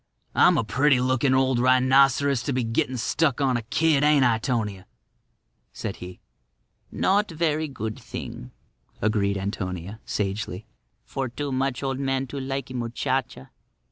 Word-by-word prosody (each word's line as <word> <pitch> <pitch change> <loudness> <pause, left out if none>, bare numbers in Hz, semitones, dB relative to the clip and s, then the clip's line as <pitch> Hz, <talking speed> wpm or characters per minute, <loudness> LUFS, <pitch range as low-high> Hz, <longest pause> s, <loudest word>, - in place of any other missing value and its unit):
"I'm - - +5
a - - +2
pretty 130 +5 +3
looking 130 +1 +2
old 130 -2 +2
rhinoceros 130 +1 +4
to 140 - -1
be 130 -1 0
gettin' 115 +2 -1
stuck 140 +3 +1
on 135 -3 +2
a 120 - 0
kid, 150 +5 +2
ain't 150 -3 +5
I, 115 -2 +3
'Tonia?" 110 -6 -2 0.9
said - - -5
he. 90 0 -9 0.7
"Not 205 +2 +1
verree 160 -1 0
good 110 -6 -5
thing," 60 - -8 0.5
agreed 100 -2 +1
Antonia, 95 0 -4
sagely, 100 0 -3 0.4
"for 135 -2 -3
too 140 +4 -4
much 135 0 -1
old 135 -1 -2
man 135 -1 0
to 140 - -5
likee 135 -1 -4
muchacha." 120 - -3
130 Hz, 140 wpm, -25 LUFS, 110-135 Hz, 0.9 s, I'm